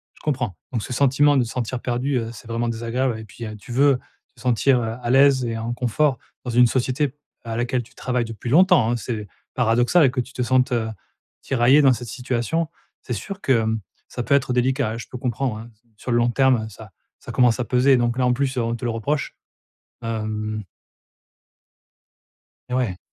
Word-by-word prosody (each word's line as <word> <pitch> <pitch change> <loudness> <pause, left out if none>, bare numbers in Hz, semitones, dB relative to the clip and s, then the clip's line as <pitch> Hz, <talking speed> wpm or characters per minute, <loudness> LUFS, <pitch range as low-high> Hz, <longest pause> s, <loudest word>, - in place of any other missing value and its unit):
Je - - -21
comprends. 125 - -2 0.2
Donc 115 -4 -1
ce 125 - -6
sentiment 140 +2 +4
de 125 - +3
se 115 - -7
sentir 125 0 -3
perdue, 125 +2 -1
heu, 115 0 -4
c'est 120 0 -12
vraiment 115 +1 -1
désagréable 115 +1 -1
et 110 - -8
puis, 115 +3 -10
heu, 110 0 -7
tu 120 +4 -11
veux 135 0 +4 0.4
te 120 - -19
sentir, 125 +1 +3
heu, 115 0 -3
à 120 - -2
l'aise 135 -1 +5
et 115 -1 -2
en 115 +1 -3
confort 125 +2 +1 0.3
dans 125 - -3
une 120 +1 +5
société 130 +3 0 0.3
à 115 -1 -4
laquelle 120 +1 0
tu 115 - -20
travailles 125 -2 -1
depuis 115 +1 -6
longtemps, 170 - +5
hein, 120 - +1
c'est 110 -1 -4 0.3
paradoxal 125 +5 +4
que 130 -1 -2
tu 130 +2 -6
te 125 - -3
sentes, 130 +1 +2
heu, 115 -2 0 0.5
tiraillée 135 +3 +4
dans 135 -2 +6
cette 120 -1 -5
situation, 130 +6 -2 0.3
c'est 125 - -5
sûr 195 - -6
que, 135 - +2
hem, 110 -2 +1 0.3
ça 125 - -4
peut 140 - +1
être 135 -2 +2
délicat, 130 -1 +1
hein. 115 - -5
Je 120 - -8
peux 125 - -7
comprendre, 125 -1 -2
hein, 115 +2 -10
s 110 +2 -35
sur 125 - -6
le 120 - +3
long 120 0 +3
terme, 130 -3 +3
heu, - - -6
ça 105 -1 -12 0.3
ça - - -8
commence 125 -1 +3
à - - 0
peser 130 +2 +4
donc, 120 0 0
là, 125 - +2
en 125 - +3
plus, 135 0 -1
heu, - - +2
on 115 0 -1
te 120 - -8
le 120 - 0
reproche, 135 +6 -2 0.7
hem. 110 -2 -3 2.1
Et - - -1
ouais. 110 -8 -1
120 Hz, 215 wpm, -22 LUFS, 115-130 Hz, 2.1 s, dans